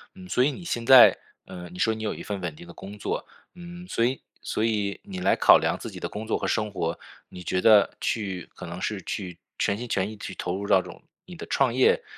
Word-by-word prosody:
嗯， 185 Hz, -1 st, -11 dB
所 125 Hz, -8 st, +2 dB
以 145 Hz, -, +2 dB
你 175 Hz, -, -9 dB
现 120 Hz, -8 st, -2 dB
在， 130 Hz, 0 st, +9 dB, 0.3 s
呃， 90 Hz, -2 st, -9 dB
你 90 Hz, -, -12 dB
说 110 Hz, +4 st, +2 dB
你 110 Hz, -, -7 dB
有 105 Hz, -, -1 dB
一 -, -, -8 dB
份 100 Hz, -2 st, -5 dB
稳 85 Hz, -4 st, -4 dB
定 85 Hz, -, -12 dB
的 85 Hz, -, -11 dB
工 100 Hz, +2 st, -10 dB
作， -, -, -3 dB, 0.3 s
嗯， 175 Hz, 0 st, -10 dB
所 115 Hz, -, 0 dB
以 130 Hz, +3 st, +1 dB, 0.2 s
所 110 Hz, -, -1 dB
以 105 Hz, -3 st, -1 dB
你 95 Hz, -1 st, -7 dB
来 90 Hz, -, +3 dB
考 -, -, +7 dB
量 -, -, 0 dB
自 -, -, -7 dB
己 -, -, -9 dB
的 -, -, -4 dB
工 105 Hz, +1 st, -6 dB
作 110 Hz, -, -1 dB
和 -, -, -2 dB
生 105 Hz, -1 st, -1 dB
活， 85 Hz, -4 st, -3 dB, 0.3 s
你 90 Hz, -, -10 dB
觉 90 Hz, +2 st, -1 dB
得 105 Hz, -3 st, +6 dB
去 95 Hz, -5 st, -3 dB
可 -, -, -8 dB
能 -, -, -7 dB
是 -, -, -2 dB
去 90 Hz, -3 st, -5 dB, 0.2 s
全 100 Hz, -1 st, +1 dB
心 120 Hz, +2 st, -6 dB
全 95 Hz, -2 st, 0 dB
意 110 Hz, -, -10 dB
去 -, -, -7 dB
投 90 Hz, -, -3 dB
入 100 Hz, -, -5 dB
到 95 Hz, -, +5 dB
这 90 Hz, -, -11 dB
种 -, -, -13 dB, 0.2 s
你 180 Hz, -, -10 dB
的 -, -, -8 dB
创 135 Hz, -3 st, +1 dB
业 130 Hz, -, +3 dB
105 Hz, 280 characters per minute, -26 LUFS, 95-120 Hz, 0.3 s, 在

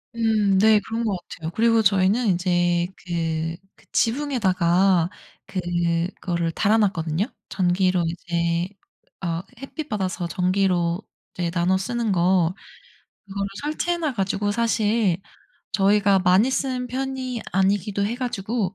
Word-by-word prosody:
음 215 Hz, -4 st, +2 dB
네. 215 Hz, +2 st, +6 dB
그런 225 Hz, +3 st, -4 dB
것 210 Hz, -4 st, 0 dB
같아요. 165 Hz, -2 st, -7 dB
그리고 230 Hz, +2 st, +3 dB
저희는 200 Hz, +4 st, +3 dB
인제 175 Hz, -1 st, +1 dB, 0.2 s
그 165 Hz, -1 st, -2 dB, 0.2 s
그 -, -, -23 dB
지붕에다가 190 Hz, -, +2 dB, 0.4 s
그거를 175 Hz, -1 st, -1 dB
달아놨거든요 195 Hz, -3 st, +1 dB, 0.2 s
전기로 180 Hz, -1 st, +1 dB
이제 170 Hz, 0 st, -1 dB, 0.6 s
어 170 Hz, -1 st, -1 dB, 0.2 s
햇빛 300 Hz, +3 st, -6 dB
받아서 185 Hz, -4 st, -2 dB
전기로 180 Hz, -1 st, +1 dB, 0.3 s
이제 175 Hz, -2 st, -2 dB
나눠 180 Hz, +2 st, +2 dB
쓰는 230 Hz, +2 st, -1 dB
거 180 Hz, -1 st, +3 dB, 0.7 s
그거를 200 Hz, 0 st, -3 dB, 0.2 s
설치해 310 Hz, +4 st, -1 dB
놔 310 Hz, -5 st, -1 dB
가지고 200 Hz, -1 st, -1 dB
사실 220 Hz, -4 st, +1 dB, 0.6 s
저희가 200 Hz, -1 st, +4 dB
많이 185 Hz, +7 st, +4 dB
쓰는 255 Hz, -1 st, -1 dB
편이 255 Hz, -1 st, -3 dB
아니기도 200 Hz, +1 st, +1 dB
해 230 Hz, -, -2 dB
가지고 225 Hz, -5 st, -2 dB
195 Hz, 265 characters per minute, -23 LUFS, 175-225 Hz, 0.7 s, 네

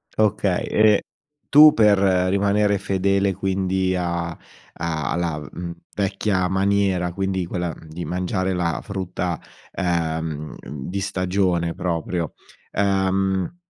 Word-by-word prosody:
Okay 105 Hz, -4 st, +1 dB
e 105 Hz, -1 st, +4 dB, 0.5 s
tu 150 Hz, +1 st, +9 dB
per 105 Hz, -3 st, +5 dB, 0.3 s
rimanere 100 Hz, +1 st, +2 dB
fedele 100 Hz, 0 st, +1 dB
quindi 95 Hz, 0 st, 0 dB
a 85 Hz, -1 st, -1 dB, 0.5 s
a 80 Hz, -4 st, -2 dB
alla, 85 Hz, -3 st, -1 dB
mhmm, 85 Hz, +4 st, -7 dB, 0.2 s
vecchia 100 Hz, -1 st, 0 dB
maniera, 95 Hz, -2 st, +1 dB
quindi 95 Hz, 0 st, -1 dB
quella, 85 Hz, -2 st, -3 dB
mhmm, 80 Hz, -, -15 dB
di 85 Hz, +2 st, -6 dB
mangiare 95 Hz, +1 st, -1 dB
la 85 Hz, -2 st, -1 dB
frutta, 90 Hz, -3 st, -3 dB, 0.3 s
ehm, 80 Hz, -4 st, -2 dB
di 75 Hz, +7 st, -5 dB
stagione 90 Hz, -3 st, 0 dB
proprio, 85 Hz, -2 st, -2 dB, 0.4 s
ehm, 95 Hz, -, +1 dB
95 Hz, 110 wpm, -22 LUFS, 85-100 Hz, 0.5 s, tu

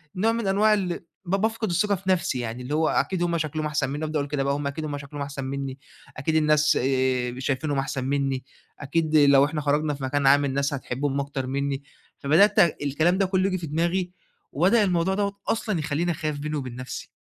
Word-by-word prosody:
نوع 220 Hz, +5 st, +2 dB
من 230 Hz, -3 st, -2 dB
أنواع 210 Hz, +3 st, +4 dB
ال 185 Hz, -4 st, -1 dB, 0.3 s
ب -, -, -4 dB
بافقد 220 Hz, +1 st, -1 dB
الثقة 200 Hz, +4 st, +2 dB
في 190 Hz, +1 st, -6 dB
نفسي 170 Hz, -8 st, 0 dB
يعني 120 Hz, +1 st, -4 dB
اللي 140 Hz, +4 st, -4 dB
هو 160 Hz, 0 st, +2 dB
أكيد 180 Hz, -2 st, 0 dB
هُم 170 Hz, -1 st, 0 dB
شكلهم 155 Hz, 0 st, -2 dB
أحسن 150 Hz, -3 st, -1 dB
مني، 150 Hz, +2 st, -3 dB
أبدأ 155 Hz, 0 st, -1 dB
أقول 140 Hz, 0 st, -3 dB
كده 140 Hz, -2 st, -1 dB
بقى 140 Hz, 0 st, +1 dB
هُم 145 Hz, 0 st, -2 dB
أكيد 150 Hz, +3 st, -4 dB
هم 145 Hz, -1 st, -3 dB
شكلهم 140 Hz, 0 st, -8 dB
أحسن 140 Hz, -1 st, -6 dB
مني، 135 Hz, 0 st, -4 dB, 0.4 s
أكيد 155 Hz, +4 st, -1 dB
الناس 150 Hz, -1 st, +3 dB
آآ 130 Hz, -1 st, 0 dB
شايفينهم 135 Hz, +2 st, -1 dB
أحسن 135 Hz, -1 st, -3 dB
مني، 135 Hz, -2 st, -1 dB, 0.4 s
أكيد 155 Hz, +2 st, -1 dB
لو 140 Hz, -1 st, +6 dB
إحنا 150 Hz, 0 st, -3 dB
خرجنا 150 Hz, +1 st, +1 dB
في 135 Hz, -, -9 dB
مكان 140 Hz, +1 st, +1 dB
عام 145 Hz, +1 st, +5 dB
الناس 140 Hz, +1 st, 0 dB
هتحبهم 135 Hz, +1 st, -2 dB
أكتر 135 Hz, -2 st, -4 dB
مني، 140 Hz, +1 st, -2 dB, 0.4 s
فبدأت 180 Hz, +9 st, +4 dB, 0.2 s
الكلام 155 Hz, +6 st, +2 dB
ده 195 Hz, -, +3 dB
كلّه 185 Hz, 0 st, +1 dB
ييجي 185 Hz, -1 st, 0 dB
في 170 Hz, -3 st, -6 dB
دماغي، 175 Hz, +4 st, 0 dB, 0.4 s
وبدأ 195 Hz, +9 st, +4 dB
الموضوع 180 Hz, -1 st, +1 dB
دوّة 200 Hz, -1 st, -1 dB
أصلًا 215 Hz, -6 st, 0 dB
يخلّيني 160 Hz, +3 st, -1 dB
أخاف 155 Hz, -2 st, -3 dB
بيني 150 Hz, +1 st, -3 dB
وبين 130 Hz, -4 st, -5 dB
نفسي. 130 Hz, +1 st, -7 dB
150 Hz, 210 wpm, -25 LUFS, 140-175 Hz, 0.4 s, لو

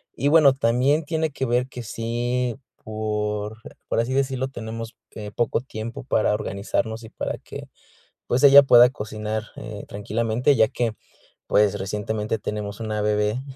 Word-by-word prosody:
Y 140 Hz, -, 0 dB
bueno, 150 Hz, -4 st, +6 dB
también 135 Hz, +5 st, +2 dB
tiene 160 Hz, 0 st, -1 dB
que 135 Hz, -1 st, -3 dB
ver 125 Hz, +1 st, +1 dB
que 125 Hz, -2 st, -7 dB
sí, 120 Hz, +2 st, -2 dB, 0.3 s
por 105 Hz, 0 st, -3 dB, 0.3 s
por -, -, 0 dB
así 120 Hz, +3 st, 0 dB
decirlo, 135 Hz, -1 st, 0 dB
tenemos 115 Hz, -2 st, -7 dB, 0.2 s
que 105 Hz, -1 st, -7 dB
poco 120 Hz, +2 st, 0 dB
tiempo 115 Hz, -1 st, -7 dB
para 110 Hz, -4 st, +1 dB
organizarnos 110 Hz, +3 st, -2 dB
y 110 Hz, -, -10 dB
para -, -, -4 dB
que, -, -, -10 dB, 0.6 s
pues, 125 Hz, +3 st, 0 dB
ella 140 Hz, 0 st, +10 dB
pueda 120 Hz, -2 st, +7 dB
cocinar, 110 Hz, -3 st, -4 dB
eh, 105 Hz, -2 st, -7 dB
tranquilamente, 115 Hz, +6 st, 0 dB
ya 110 Hz, -1 st, +4 dB
que, 115 Hz, -3 st, -2 dB, 0.5 s
pues, 105 Hz, -1 st, +3 dB
recientemente 105 Hz, +3 st, -2 dB
tenemos 105 Hz, 0 st, -5 dB
una 110 Hz, -1 st, -2 dB
bebé, 105 Hz, +3 st, 0 dB
115 Hz, 150 wpm, -23 LUFS, 105-125 Hz, 0.6 s, ella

